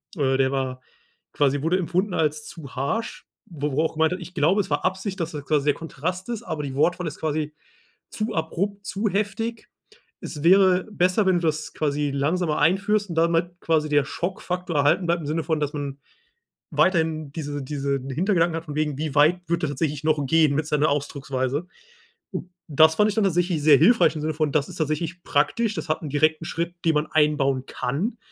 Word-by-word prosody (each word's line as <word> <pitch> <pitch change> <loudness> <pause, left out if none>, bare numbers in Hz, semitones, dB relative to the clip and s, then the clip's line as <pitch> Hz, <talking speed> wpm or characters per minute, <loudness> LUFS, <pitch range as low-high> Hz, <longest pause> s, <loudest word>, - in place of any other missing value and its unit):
Äh, 135 -3 +1
der 135 0 +2
war 130 -1 -2 0.5
quasi 145 -1 +1
wurde 180 +3 +2
empfunden 185 +3 -1
als 150 -1 0
zu 140 -5 -10
harsch, 180 - -3 0.2
wo 150 -4 -4
er 150 +3 +1
auch - - -2
gemeint 160 +2 +2
hat: 185 - -5
„Ich 180 +2 -10
glaube, 170 +7 +3
es - - -7
war 145 +3 -1
Absicht, 190 +1 -2
dass 165 -1 -2
das 145 -2 -6
quasi 150 -2 +1
der 145 - +4
Kontrast 175 - -5
ist, 235 -3 -4
aber 155 -2 -4
die 135 -2 -5
Wortwahl 175 +4 +1
ist 150 - -7
quasi 155 -1 -2 0.6
zu 215 +1 -2
abrupt, 195 +5 -2
zu 205 +2 -1
heftig. 215 +3 -3 0.5
Es 150 -1 -6
wäre 185 0 +5
besser, 185 +2 +2
wenn 185 -2 +3
du 170 - 0
das 155 0 -2
quasi 145 -1 -1
langsamer 155 +3 0
einführst 195 +6 +2
und 165 - -4
damit 170 +1 +1
quasi 155 -2 +1
der 145 -1 +3
Schockfaktor 180 0 -4
erhalten 145 +5 +3
bleibt 170 0 +1
im - - -7
Sinne 160 +1 -1
von, 160 -2 -1
dass 145 0 0
man 140 -2 -4 0.7
weiterhin 160 -5 +1
diese 145 -3 -5
diesen 140 -1 -3
Hintergedanken 170 +2 +1
hat 165 - -7
von 150 - -7
wegen: 150 -2 -1
Wie 150 -1 -3
weit 155 +5 +5
wird 170 0 0
er 155 - +1
tatsächlich 145 +1 -2
noch 155 -2 +1
gehen 155 -2 +4
mit 155 0 -1
seiner 150 0 +2
Ausdrucksweise?“ 140 +1 -2 1.0
Das 160 +1 +5
fand 210 +3 +4
ich 205 - -3
dann 220 - +2
tatsächlich 175 -4 +1
sehr 150 -3 +7
hilfreich 230 - +5
im - - -3
Sinne 155 0 -1
von, 155 -2 0
das 145 -1 +1
ist 180 - -9
tatsächlich 160 +3 -2
praktisch. 205 +10 +1
Das - - -5
hat 155 - 0
'n 150 - -4
direkten 155 +3 +2
Schritt, 170 +2 -3
den 160 - +4
man 150 +1 +1
einbauen 140 -4 +2
kann. 175 - -3
160 Hz, 200 wpm, -24 LUFS, 145-180 Hz, 1.0 s, sehr